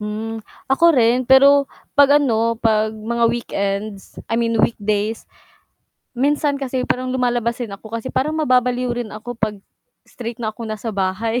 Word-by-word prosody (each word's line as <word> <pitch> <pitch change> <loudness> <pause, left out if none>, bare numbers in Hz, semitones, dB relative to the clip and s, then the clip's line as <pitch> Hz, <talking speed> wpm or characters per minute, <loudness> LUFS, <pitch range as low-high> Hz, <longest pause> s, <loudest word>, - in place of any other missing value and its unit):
Hmm, 215 +1 -5 0.2
ako 335 +5 +5
rin 245 0 +3
pero 280 +2 +6 0.3
'pag 285 +1 +6
ano, 230 -4 +1
'pag 220 -1 +2
mga 230 +2 -2
weekends, 200 -3 -4
I 225 - 0
mean 230 -1 +1
weekdays 210 0 -1 0.9
minsan 285 +2 0
kasi 260 -1 -2
parang 255 0 -2
lumalabas 245 -2 0
din 235 -5 -6
ako 210 +3 -10
kasi 230 - -6
parang 305 +4 0
mababaliw 250 -4 +1
rin 240 -2 -4
ako 215 +4 -7
'pag 215 -1 -1 0.5
straight 235 -1 -7
na 220 -3 -3
ako 230 0 -8
nasa 215 +1 -4
bahay, 200 +5 -1
235 Hz, 155 wpm, -20 LUFS, 215-255 Hz, 0.9 s, pero